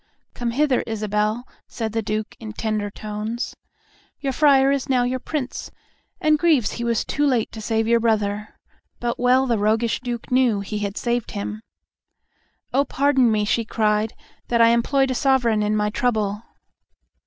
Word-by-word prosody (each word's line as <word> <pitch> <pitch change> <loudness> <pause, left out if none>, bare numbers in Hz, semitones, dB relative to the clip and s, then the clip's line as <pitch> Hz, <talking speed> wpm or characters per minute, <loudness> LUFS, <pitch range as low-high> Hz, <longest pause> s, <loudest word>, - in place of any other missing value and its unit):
"Come 240 -1 -3
hither, 270 +1 +2
Isabel," 215 +2 -1 0.2
said 225 -2 -4
the 225 +1 -1
Duke, 215 0 -3
in 220 -2 -7
tender 215 -2 -2
tones. 215 +3 -5 0.6
"Your 270 -2 -2
friar 275 -1 +5
is 275 -1 -1
now 255 -2 +3
your 255 +1 -1
Prince, 270 -1 -4 0.5
and 305 -1 +3
grieves 300 -11 +3
he 235 - -5
was 235 -2 0
too 295 - -1
late 255 -6 +1
to 220 - -8
save 225 0 0
your 235 0 +4
brother;" 210 -2 -1 0.4
but 240 -1 -2
well 255 +2 +4
the 235 -4 +1
roguish 220 +2 +1
Duke 240 -2 -5
knew 250 -5 +3
he 210 +2 -4
had 200 0 -3
saved 240 -1 -1
him. 210 +1 -4 1.1
"O 275 +2 +4
pardon 270 -3 +2
me," 210 -1 +1
she 230 +2 +1
cried, 215 0 0 0.3
"that 235 - +1
I 230 0 +7
employed 265 +3 +2
my - - 0
Sovereign 250 -5 +2
in 210 0 +1
my 210 0 0
trouble." 215 -3 0
230 Hz, 165 wpm, -22 LUFS, 215-255 Hz, 1.1 s, I